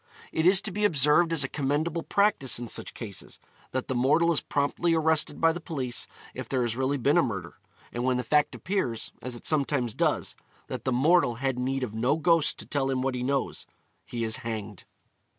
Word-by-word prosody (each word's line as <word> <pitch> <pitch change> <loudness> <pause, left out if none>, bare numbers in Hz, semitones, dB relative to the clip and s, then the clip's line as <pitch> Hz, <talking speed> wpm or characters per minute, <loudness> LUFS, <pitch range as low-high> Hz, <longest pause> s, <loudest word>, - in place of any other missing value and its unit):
It 160 +2 +1
is 190 +1 +5
to 215 - -3
be 210 +2 -3
observed 165 -2 +4
as 160 -4 +3
a - - -1
commendable 150 +5 -1
practice 200 - +2
in 120 0 -6
such - - -4
cases, 105 -5 -7 0.3
that 130 0 -3
the - - -1
mortal 145 +7 +3
is 160 - +2
promptly 150 +4 0
arrested 160 -2 +1
by 165 0 +4
the 170 +1 -6
police 130 -7 -3 0.3
if - - -7
there 130 -2 +1
has 120 -1 -1
really 135 +2 0
been 140 +6 +3
a - - +6
murder; 95 - -4 0.3
and 120 - -3
when 130 0 +2
the 125 - -2
fact 150 +2 +2
appears, 130 - -2
as 125 -1 -4
it 120 - -10
sometimes 140 -6 +1
does, - - 0 0.3
that - - -6
the 130 - +1
mortal 135 0 +3
had 130 +1 -2
need 135 +1 -1
of 115 -4 -4
no 125 +7 +1
ghost 165 -2 +2
to - - -6
tell 135 -2 -1
him 130 -1 0
what 135 -1 0
he 125 - -3
knows, 135 +2 -2 0.4
he 120 -1 -4
is 110 +1 0
hanged. 110 -5 -6
135 Hz, 210 wpm, -27 LUFS, 125-160 Hz, 0.4 s, a